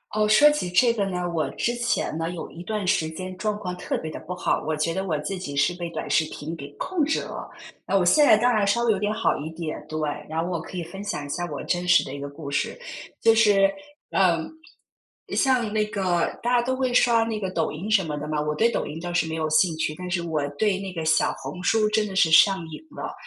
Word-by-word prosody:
哦， 215 0 +3
说 215 +8 +7
起 295 -12 -2
这 230 +7 +4
个 205 -4 0
呢， 180 -2 -2
我 155 -5 -1
之 240 +10 -1
前 240 -9 -1
呢， 165 0 -2
有 170 -2 -6
一 175 - -10
段 210 -1 -3
时 160 -3 +2
间 185 +3 -7
状 210 0 -1
况 180 -3 -4
特 180 - -3
别 160 - -5
地 - - -7
不 180 - -6
好， 180 - -1
我 155 - -1
觉 165 +2 0
得 190 +3 -2
我 160 -5 -1
自 170 +6 -4
己 145 -6 -6
是 145 +5 +2
被 175 -1 -5
短 - - -5
视 160 - +3
频 155 +3 -6
给 140 -3 -8
控 355 -5 -1
制 315 +3 +1
了。 - - -7 0.4
那 195 - +2
我 185 - +2
现 295 +12 +5
在 215 - +7
当 245 +3 +3
然 210 -2 +2
稍 235 +4 +2
微 235 - +3
有 - - -2
点 210 +2 -1
好 - - +1
一 155 +2 -5
点， 160 -1 -6
对， 155 0 -3 0.3
然 160 +1 -1
后 175 - -3
我 170 -3 -2
可 180 - -8
以 175 - -2
分 195 +5 -8
享 175 -8 -4
一 - - -9
下 175 +4 -2
我 145 - -4
真 175 0 -1
实 180 - +5
的 135 - -7
一 145 - -6
个 140 - -5
故 140 0 -8
事。 140 - -2 0.4
就 225 0 +5
是， 205 -3 +5 0.4
嗯， 170 -4 +2 0.9
像 250 -6 +2
那 215 -1 +2
个， 185 -5 -1
大 245 +1 +1
家 240 - +4
都 255 +2 -1
会 260 -1 -1
刷 235 -2 +4
那 225 -1 -2
个 190 -3 -3
抖 165 -3 0
音 185 +8 -5
什 195 -4 +4
么 150 -2 -3
的 150 +1 -5
嘛， 155 -1 -1
我 150 0 -2
对 230 +7 +3
抖 - - -1
音 150 - -6
倒 175 0 -4
是 175 -2 +1
没 160 - -3
有 160 -1 -1
兴 160 +2 +3
趣， 155 -1 -1
但 180 0 -6
是 180 -1 0
我 160 -3 -1 0.2
对 205 -3 +1
那 195 -2 -6
个 165 -2 -4
小 160 0 +2
红 180 - -7
书 215 +3 +2
真 215 0 +1
得 195 - -7
是 165 -4 +4
上 190 +4 +6
瘾 155 - -9
了。 - - -5
180 Hz, 290 characters per minute, -24 LUFS, 160-215 Hz, 0.9 s, 说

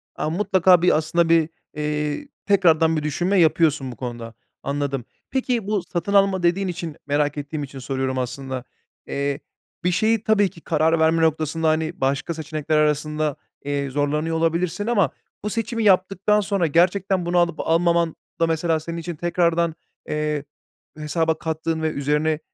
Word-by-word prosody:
A, - - -2
mutlaka 185 0 +4
bir 180 -3 +4
aslında 165 +2 +1
bir, 165 -1 +4 0.3
eee, 150 - -2 0.2
tekrardan 165 -5 +4
bir 150 - -2
düşünme 175 +6 +1
yapıyorsun 155 -4 +3
bu - - -9
konuda. 120 -2 -6 0.3
Anladım. 140 -3 -2 0.3
Peki, 250 -5 -1
bu 210 -2 0
"satın 175 +2 -3
alma" 195 -2 +3
dediğin 180 +3 +2
için, 165 -3 -5
merak 145 0 +1
ettiğim 145 +1 -4
için 135 -1 -8
soruyorum 130 0 -2
aslında. 130 0 -4 0.4
Eee, 140 0 -2 0.4
bir 180 - +2
şeyi 220 +4 +2
tabii 205 -3 +3
ki 165 - -16
karar 160 0 +2
verme 160 +1 +3
noktasında, 160 0 +1
hani, 160 +2 -1
başka 140 +5 0
seçenekler 155 -1 -2
arasında, 150 0 +1 0.3
eee, 140 -1 -1
zorlanıyor 150 +4 0
olabilirsin 165 +5 0
ama 200 - +2 0.3
bu 210 - -1
seçimi 230 +1 -2
yaptıktan 195 +1 +3
sonra 195 -4 0
gerçekten 180 +3 +2
bunu 175 +1 0
alıp 170 -2 +2
almaman 170 0 +2 0.2
da 165 - +3
mesela 160 0 +1
senin 165 +2 -6
için 170 0 -5
tekrardan, 170 0 +1 0.3
eee, 150 -1 -1 0.5
hesaba 160 +1 0
kattığın 160 0 -2
ve 160 - +1
üzerine, 150 +2 0
160 Hz, 155 wpm, -22 LUFS, 150-175 Hz, 0.5 s, mutlaka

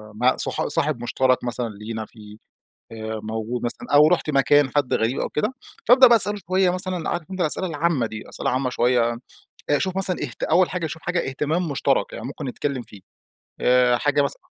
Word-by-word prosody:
مع 125 +4 +2
صح - - 0
صاحب 120 - -1
مشترك 130 +1 +1
مثلًا 120 -1 -3
لينا 110 +1 -6
في 105 -1 -14 0.5
آآ 110 -1 -5
موجود 110 +2 -4
مثلًا، 120 - -5
أو 150 +1 +7
رُحت 170 -1 +1
مكان 145 0 +3
حد 145 -3 +1
غريب 115 +4 0
أو - - -2
كده، 150 +12 -2 0.3
فابدأ 255 +2 +8
بقى 235 - +6
أسأله 205 -1 +4
شوية 185 0 +2
مثلًا، 180 -2 -2
عارف 175 +2 -4
أنتَ 185 -1 -4
الأسئلة 175 +3 +1
العامة 160 -5 0
دي، 110 0 -9
أسئلة - - -2
عامة 130 0 -1
شوية، 120 -1 +1 0.5
أشوف 185 +6 0
مثلًا 190 -2 +3
اهت - - -7
أول 175 +3 +3
حاجة 180 -3 -3
أشوف 160 +1 -8
حاجة 175 -4 -2
اهتمام 155 +6 -2
مشترك 140 - 0
يعني - - -7
ممكن - - -7
نتكلم 130 +1 -3
فيه. 105 -3 -15 0.6
آآ 125 -1 +4
حاجة 145 +3 +1
مثلًا 140 - -3
140 Hz, 190 wpm, -22 LUFS, 120-175 Hz, 0.6 s, فابدأ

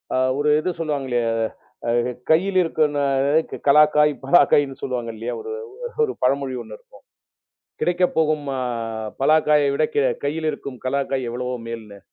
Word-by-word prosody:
அ - - +2 0.2
ஒரு 145 +1 +1
இது 170 - -2
சொல்லுவாங்களே 140 -6 -2 0.7
அ - - +1 0.4
கையில 185 +4 +3
இருக்குன்னு 150 -3 0 0.7
கலாக்காய், 150 +1 +5
பலாக்காய்ன்னு 140 -2 +4
சொல்லுவாங்க 125 -3 -3
இல்லையா. 115 +3 -4
ஒரு 445 - -7 0.5
ஒரு 445 - -1
பழமொழி 135 +1 +1
ஒண்ணு - - -10
இருக்கும். - - -20 0.8
கிடைக்கப்போகும் 160 -4 +1
அ - - -1 0.6
பலாக்காயை 150 0 +4
விட, 150 - 0
க - - +1 0.3
கையில் 155 +2 -1
இருக்கும் 135 -4 -8
கலாக்காய் 135 -1 -1
எவ்வளவோ 125 +1 -3
மேலுன்னு. 110 -3 -8
145 Hz, 130 wpm, -22 LUFS, 130-155 Hz, 0.8 s, கலாக்காய்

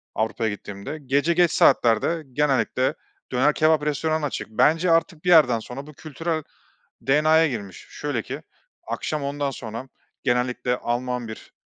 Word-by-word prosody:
Avrupa'ya 110 0 0
gittiğimde; 100 +7 -7
gece 140 +5 +2
geç 175 -1 +4
saatlerde 135 +6 +3
genellikle 130 -2 +1 0.4
döner 130 +4 +3
kebap 155 -1 +3
restoranı 155 +1 0
açık. 140 - -4
Bence 165 +10 +3
artık 165 -1 +1
bir - - +2
yerden 150 -9 +6
sonra 135 +6 -8
bu 150 - -11
kültürel 155 +2 -4 0.6
DNA'ya 155 +4 +4
girmiş. 100 -8 -7
Şöyle - - -3
ki - - -7 0.4
akşam 155 -2 -3
ondan 140 0 -2
sonra 120 0 -7 0.4
genellikle 125 0 0
Alman 125 0 -2
bir 110 - -10
140 Hz, 140 wpm, -24 LUFS, 125-155 Hz, 0.6 s, yerden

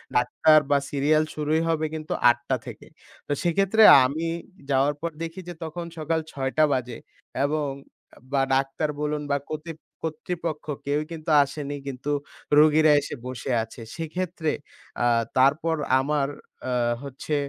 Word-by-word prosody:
Doctor 140 +5 +5
বা 145 - +6
serial 150 +2 +3
শুরুই 155 +1 +1
হবে 160 -1 +1
কিন্তু 155 -1 -4 0.2
৮ঃ০০ 120 - +3
টা 130 - +3
থেকে। - - -9 0.4
তো - - -5
সেক্ষেত্রে 195 +5 +3 0.2
আমি 155 +6 -2 0.4
যাওয়ার 140 +1 +3
পর 170 - -1
দেখি 165 +3 -6
যে - - -5
তখন 165 +2 -5
সকাল 160 +1 0
৬ঃ০০ 135 -1 -2
টা 155 - +6
বাজে 125 -2 -3 0.5
এবং 150 +1 0 0.6
বা 140 -1 +2
ডাক্তার 135 +3 0
বলুন 150 0 -1
বা 140 - +3
কতিত 155 +1 -6 0.3
কর্তৃপক্ষ 160 0 -4 0.2
কেউই 145 +2 0
কিন্তু 160 -1 -6
আসেনি, 145 0 -5
কিন্তু 135 +2 -4 0.5
রোগীরা 155 +1 +6
এসে 145 - -6
বসে 130 +1 -4
আছে। 115 +1 -11
সেক্ষেত্রে 165 0 -3 0.5
আ - - +3 0.3
তারপর 150 +5 +3 0.2
আমার 140 +1 0 0.4
আ - - -1 0.3
হচ্ছে 140 +2 -4
150 Hz, 145 wpm, -25 LUFS, 140-160 Hz, 0.6 s, বা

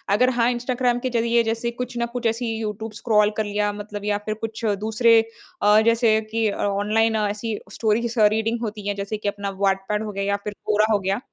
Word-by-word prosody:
अगर 250 +3 +4
हाँ 235 +1 +4
इंस्टाग्राम 245 0 0
के 255 - -2
ज़रिए 235 0 +2
जैसे 230 +1 -2
कुछ 250 0 -6
ना 235 - 0
कुछ 245 - -3
ऐसी 225 0 -1
यूट्यूब 215 0 -4
स्क्रॉल 210 -3 +3
कर 220 - +1
लिया 205 0 0
मतलब 205 0 -7
या 205 -1 +1
फ़िर 215 0 -2
कुछ 225 +1 -4
दूसरे 225 +1 +4 0.4
अ, 210 +1 +6
जैसे 230 -1 +4
कि 225 -1 +1
ऑनलाइन 210 +3 +1
ऐसी 210 +1 -1 0.2
स्टोरीज़ 230 +1 0
अ, 210 - +7
रीडिंग 220 +2 0
होती 210 -2 -5
है 205 - -1
जैसे 200 +2 -4
कि 210 - -5
अपना 200 0 -4
व्हाट 195 -1 +2
पेड 210 +1 0
हो 210 - -4
गया 200 0 -3
या 200 0 +1
फ़िर 210 - -4
क्वोरा 215 0 +3
हो 205 - +3
गया। 195 +3 -1
220 Hz, 215 wpm, -23 LUFS, 205-230 Hz, 0.4 s, अ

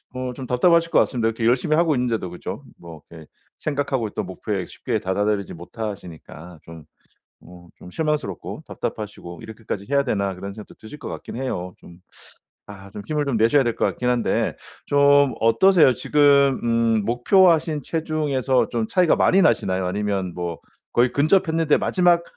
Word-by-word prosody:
어 130 0 -4
좀 130 +1 -8
답답하실 165 +7 +2
것 - - +4
같습니다. 120 -3 +1
이렇게 115 0 -3
열심히 130 +6 +2
하고 160 -2 +2
있는데도 120 -7 -1
그죠? 90 - -7
뭐 85 -3 -12
이렇게 80 -2 -12 0.3
생각하고 140 -5 -2
있던 105 0 -4
목표에 95 0 -4
쉽게 115 -4 -3
도달하지 100 +1 -1
못하시니까 90 -3 -9
좀 80 -1 -12 0.6
어 85 0 -15
좀 - - -12
실망스럽고, 150 - -3
답답하시고 100 -5 -6
'이렇게까지 110 -2 -7
해야 140 0 +3
되나?' 100 -6 -1
그런 100 +2 -7
생각도 105 +1 -12
드실 110 +7 -12
것 - - -8
같긴 - - -8
해요. 90 -9 -4
좀 85 - -16 0.7
아 100 -1 -11
좀 105 - -8
힘을 150 -1 -1
좀 135 -5 -1
내셔야 115 +6 +4
될 120 -2 -1
것 - - 0
같긴 125 - -2
한데 120 -2 0 0.3
좀 140 -1 +4
어떠세요? 155 +4 +5
지금 140 -2 +3
음 115 -2 +1
목표하신 160 - +3
체중에서 150 -5 -1
좀 115 -2 -2
차이가 180 -3 +3
많이 195 - +4
나시나요? 95 -6 +1
아니면 100 -2 -2
뭐 85 -2 -4 0.4
거의 120 +1 +3
근접했는데 160 0 +2
마지막 175 -2 +2
120 Hz, 370 characters per minute, -22 LUFS, 100-145 Hz, 0.7 s, 어떠세요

